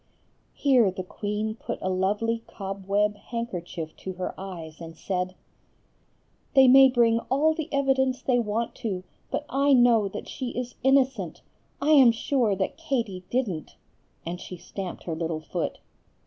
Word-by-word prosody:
Here 255 Hz, -7 st, +4 dB
the 185 Hz, 0 st, -5 dB
queen 210 Hz, +3 st, -3 dB
put 225 Hz, -, -5 dB
a -, -, -3 dB
lovely 205 Hz, +5 st, 0 dB
cobweb 200 Hz, +1 st, -1 dB
handkerchief 180 Hz, -10 st, -5 dB
to 190 Hz, -, -6 dB
her 180 Hz, 0 st, -4 dB
eyes, 170 Hz, -5 st, -8 dB
and 165 Hz, -1 st, -9 dB
said:— 185 Hz, 0 st, -2 dB, 1.2 s
"They 265 Hz, -1 st, +8 dB
may 270 Hz, +1 st, +9 dB
bring 235 Hz, -2 st, +3 dB
all 300 Hz, +4 st, +3 dB
the 315 Hz, 0 st, -5 dB
evidence 265 Hz, -2 st, +2 dB
they 250 Hz, -2 st, +2 dB
want 225 Hz, +1 st, -1 dB
to, 200 Hz, -7 st, -3 dB, 0.3 s
but 300 Hz, -, -2 dB
I 275 Hz, +1 st, +3 dB
know 240 Hz, -4 st, +5 dB
that 205 Hz, +2 st, -7 dB
she 250 Hz, -2 st, -5 dB
is 250 Hz, 0 st, -3 dB
innocent; 265 Hz, 0 st, +2 dB, 0.4 s
I 295 Hz, +2 st, +2 dB
am 270 Hz, -6 st, +8 dB
sure 230 Hz, -2 st, +1 dB
that 190 Hz, +8 st, -2 dB
Katie 235 Hz, -, -2 dB
didn't;" 205 Hz, -, -2 dB, 0.5 s
and 175 Hz, +2 st, -5 dB
she 180 Hz, -, -8 dB
stamped 185 Hz, +1 st, -7 dB
her 170 Hz, -, -3 dB
little 165 Hz, -1 st, -2 dB
foot. -, -, -3 dB
220 Hz, 150 wpm, -26 LUFS, 185-260 Hz, 1.2 s, may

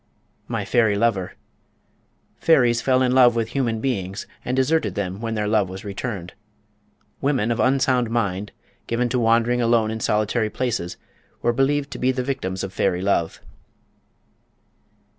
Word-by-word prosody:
My 115 Hz, -4 st, -3 dB
Fairy 110 Hz, -1 st, +2 dB
Lover. 100 Hz, -5 st, 0 dB, 1.1 s
Fairies 120 Hz, -7 st, +4 dB
fell 130 Hz, -1 st, +2 dB
in 125 Hz, -, +2 dB
love 125 Hz, -2 st, +6 dB
with 115 Hz, -1 st, -1 dB
human 120 Hz, -5 st, -1 dB
beings, 100 Hz, -6 st, -3 dB, 0.2 s
and 125 Hz, -, -2 dB
deserted 145 Hz, +5 st, +1 dB
them 100 Hz, 0 st, -3 dB
when 115 Hz, -1 st, -3 dB
their 105 Hz, -1 st, -1 dB
love 105 Hz, -3 st, +2 dB
was 95 Hz, +2 st, -8 dB
returned. 100 Hz, -3 st, -5 dB, 0.9 s
Women 130 Hz, -5 st, +1 dB
of 115 Hz, -, -1 dB
unsound 130 Hz, -2 st, +2 dB
mind, 105 Hz, -4 st, -1 dB, 0.4 s
given 120 Hz, +1 st, 0 dB
to 125 Hz, +1 st, 0 dB
wandering 120 Hz, +1 st, +2 dB
alone 115 Hz, -2 st, +2 dB
in 110 Hz, -, -4 dB
solitary 110 Hz, +1 st, 0 dB
places, 110 Hz, -7 st, -3 dB, 0.5 s
were 120 Hz, -, +2 dB
believed 140 Hz, +3 st, +1 dB
to -, -, -6 dB
be 130 Hz, +1 st, +2 dB
the 130 Hz, -1 st, -2 dB
victims 125 Hz, -9 st, -3 dB
of 95 Hz, -1 st, -5 dB
fairy 95 Hz, -1 st, 0 dB
love. 85 Hz, -4 st, 0 dB
115 Hz, 150 wpm, -22 LUFS, 100-125 Hz, 1.1 s, love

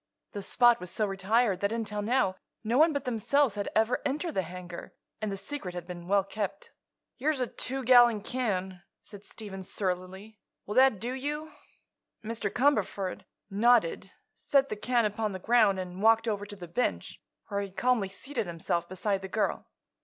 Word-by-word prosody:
The 205 Hz, -, -5 dB
spot 240 Hz, +4 st, +4 dB
was 180 Hz, -, -7 dB
so 215 Hz, -, 0 dB
retired 195 Hz, +1 st, +1 dB
that 200 Hz, +1 st, 0 dB
until 215 Hz, -2 st, -2 dB
now 210 Hz, -4 st, +1 dB, 0.3 s
no 230 Hz, +4 st, +1 dB
one 320 Hz, +1 st, +6 dB
but 285 Hz, -2 st, -3 dB
themselves 250 Hz, +2 st, +2 dB
had 205 Hz, -1 st, -3 dB
ever 220 Hz, +3 st, +2 dB
entered 300 Hz, +5 st, -1 dB
the 190 Hz, -, +1 dB
hangar, 180 Hz, 0 st, -9 dB, 0.3 s
and 215 Hz, -1 st, -1 dB
the 195 Hz, -, -3 dB
secret 200 Hz, -4 st, -6 dB
had 175 Hz, -1 st, -5 dB
been 175 Hz, -1 st, -8 dB
well 200 Hz, 0 st, +3 dB
kept. 195 Hz, 0 st, -5 dB, 0.5 s
"Here's 290 Hz, +2 st, 0 dB
a 250 Hz, -, +1 dB
two 265 Hz, +2 st, -3 dB
gallon 240 Hz, -3 st, +6 dB
can," 190 Hz, -7 st, -2 dB, 0.2 s
said 205 Hz, -1 st, -12 dB
Stephen, 200 Hz, -4 st, -8 dB
surlily. 190 Hz, +3 st, -4 dB, 0.3 s
"Will 205 Hz, -, -4 dB
that 260 Hz, -5 st, +5 dB
do 240 Hz, +4 st, -3 dB
you?" 295 Hz, +4 st, -4 dB, 0.7 s
Mr. 220 Hz, -2 st, -2 dB
Cumberford 215 Hz, -8 st, 0 dB, 0.3 s
nodded, 205 Hz, -3 st, +3 dB, 0.2 s
set 275 Hz, -1 st, +2 dB
the -, -, -2 dB
can 235 Hz, +2 st, +1 dB
upon 210 Hz, 0 st, -1 dB
the -, -, -3 dB
ground 210 Hz, -1 st, +3 dB
and 180 Hz, 0 st, -6 dB
walked 225 Hz, +1 st, +4 dB
over 205 Hz, -2 st, -2 dB
to 205 Hz, -, -8 dB
the 180 Hz, -3 st, -9 dB
bench, 210 Hz, +9 st, -2 dB, 0.3 s
where 200 Hz, -1 st, -1 dB
he 200 Hz, -, -5 dB
calmly 210 Hz, +2 st, +1 dB
seated 230 Hz, +3 st, -4 dB
himself 170 Hz, +1 st, -2 dB
beside 195 Hz, +1 st, -1 dB
the 190 Hz, -, -5 dB
girl. 215 Hz, +3 st, -1 dB
210 Hz, 175 wpm, -29 LUFS, 190-245 Hz, 0.7 s, one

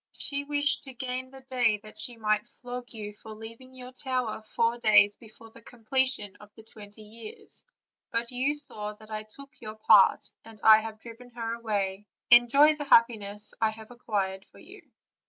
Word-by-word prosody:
She 280 Hz, -1 st, -1 dB
wished 290 Hz, 0 st, 0 dB
to 265 Hz, -2 st, -10 dB
gain 255 Hz, +1 st, -4 dB
the 265 Hz, 0 st, -13 dB
day 245 Hz, -5 st, +1 dB
that 215 Hz, -, -11 dB
she 240 Hz, -2 st, -3 dB
might 215 Hz, 0 st, 0 dB
flog 245 Hz, 0 st, -9 dB
you 210 Hz, -3 st, -7 dB
for 215 Hz, +1 st, -11 dB
leaving 230 Hz, +4 st, -12 dB
your 250 Hz, 0 st, -9 dB
tower 255 Hz, -4 st, -3 dB
four 230 Hz, +2 st, -1 dB
days 205 Hz, -2 st, +5 dB
before 225 Hz, 0 st, -15 dB
the 230 Hz, -, -15 dB
completion 245 Hz, -2 st, -1 dB
of 210 Hz, -, -15 dB
the 220 Hz, -, -14 dB
twenty 215 Hz, -1 st, -14 dB
years; 215 Hz, +1 st, -11 dB, 0.5 s
but 235 Hz, +1 st, -1 dB
you 260 Hz, +4 st, 0 dB
saw 210 Hz, -8 st, -2 dB
that 215 Hz, +1 st, -16 dB
I 215 Hz, 0 st, -3 dB
took 275 Hz, +6 st, -14 dB
your 215 Hz, 0 st, -8 dB
part, 215 Hz, -, +5 dB
and 225 Hz, -1 st, -14 dB
that -, -, -13 dB
I 220 Hz, 0 st, +9 dB
have 220 Hz, 0 st, -7 dB
driven 240 Hz, +1 st, -12 dB
her 230 Hz, -1 st, -3 dB
away: 205 Hz, -3 st, -3 dB, 0.2 s
enjoy 275 Hz, +6 st, +7 dB
the 295 Hz, -, -5 dB
happiness 210 Hz, -5 st, +2 dB
I 220 Hz, -, +3 dB
have 220 Hz, +1 st, -11 dB
acquired 195 Hz, -5 st, -3 dB
for -, -, -22 dB
you." -, -, -15 dB
230 Hz, 185 wpm, -28 LUFS, 215-250 Hz, 0.5 s, I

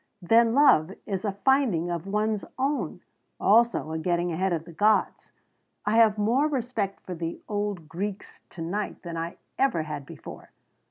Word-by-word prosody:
Then 230 Hz, +5 st, +4 dB
love 190 Hz, -, +5 dB
is 195 Hz, -2 st, -3 dB
a 205 Hz, -, +1 dB
finding 230 Hz, -, +3 dB
of 170 Hz, +2 st, -4 dB
one's 210 Hz, +1 st, 0 dB
own 275 Hz, +3 st, -1 dB, 0.4 s
also, 230 Hz, -6 st, +3 dB
a 160 Hz, -, -2 dB
getting 175 Hz, +1 st, 0 dB
ahead 185 Hz, +3 st, 0 dB
of 165 Hz, -2 st, -2 dB
the 170 Hz, -, -11 dB
gods. 210 Hz, +6 st, +1 dB, 0.5 s
I 210 Hz, +2 st, +2 dB
have 220 Hz, -2 st, +5 dB
more 235 Hz, +8 st, +2 dB
respect 240 Hz, -8 st, -2 dB
for 185 Hz, -, -5 dB
the 165 Hz, -1 st, -4 dB
old 205 Hz, -5 st, -3 dB
Greeks 195 Hz, +5 st, -6 dB
to 165 Hz, -, -7 dB
night 200 Hz, +6 st, -4 dB
than 170 Hz, -2 st, -6 dB
I 165 Hz, +1 st, -4 dB, 0.2 s
ever 260 Hz, -13 st, +2 dB
had 150 Hz, -3 st, -6 dB
before! -, -, -10 dB
200 Hz, 165 wpm, -26 LUFS, 170-225 Hz, 0.5 s, love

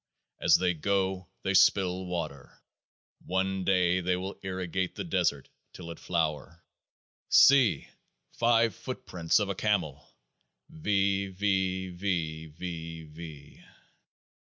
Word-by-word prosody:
As -, -, +6 dB
they 90 Hz, -1 st, +1 dB
go 95 Hz, +1 st, -1 dB, 0.2 s
they 95 Hz, -, 0 dB
spill 95 Hz, -1 st, +3 dB
water; 80 Hz, -7 st, -5 dB, 0.6 s
one 95 Hz, +1 st, -1 dB
day 90 Hz, -1 st, +3 dB
they 90 Hz, 0 st, 0 dB
will 95 Hz, +2 st, -5 dB
irrigate 95 Hz, -1 st, -3 dB
the -, -, -4 dB
desert, -, -, 0 dB, 0.3 s
till 85 Hz, -2 st, -8 dB
it 85 Hz, -, -10 dB
flower. 80 Hz, -1 st, -2 dB, 0.6 s
See! 135 Hz, -5 st, +5 dB, 0.4 s
five 115 Hz, -2 st, +3 dB
footprints 85 Hz, -1 st, -2 dB
of 105 Hz, -, +1 dB
a -, -, 0 dB
Camel! 90 Hz, -9 st, -1 dB, 0.6 s
V. 100 Hz, -9 st, 0 dB
95 Hz, 95 wpm, -29 LUFS, 85-100 Hz, 0.6 s, As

